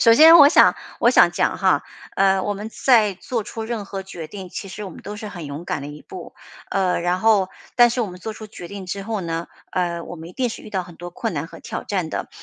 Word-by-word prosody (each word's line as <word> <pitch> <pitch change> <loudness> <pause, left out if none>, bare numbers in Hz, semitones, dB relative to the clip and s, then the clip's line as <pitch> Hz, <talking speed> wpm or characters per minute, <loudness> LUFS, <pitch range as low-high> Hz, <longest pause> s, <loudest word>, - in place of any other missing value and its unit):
首 230 - +7
先 320 +7 +9
我 285 -2 +10
想 305 - +6 0.2
我 - - +4
想 - - +6
讲 - - 0
哈， - - +2 0.3
呃， 195 0 +4
我 205 +2 -1
们 210 +2 -6
在 225 -4 +3
做 225 +3 -4
出 225 - -6
任 220 -2 -4
何 195 0 -6
决 175 -4 -8
定， 190 +2 -9
其 195 - -6
实 210 - -7
我 195 - -6
们 - - -12
都 205 +1 -7
是 210 0 -7
很 175 -6 -8
勇 145 +4 -7
敢 145 - -3
的 - - -6
一 150 0 -10
步。 180 -3 -10 0.4
呃， 190 -2 +1
然 175 +1 0
后 210 -4 +4 0.3
但 240 -1 +7
是 245 - -1
我 225 - 0
们 180 0 -10
做 220 +4 -5
出 215 0 -10
决 180 -4 -10
定 195 +1 -8
之 195 +2 -4
后 220 -1 -2
呢， 165 -1 -3 0.2
呃， 175 -2 -1
我 175 - -8
们 165 0 -9
一 - - -12
定 250 +5 -1
是 225 - -8
遇 - - -11
到 190 -3 -1
很 175 -2 -13
多 175 0 -8
困 225 +5 -3
难 - - -3
和 - - -13
挑 - - -6
战 180 -6 -2
的， - - -4
195 Hz, 290 characters per minute, -22 LUFS, 175-220 Hz, 0.4 s, 我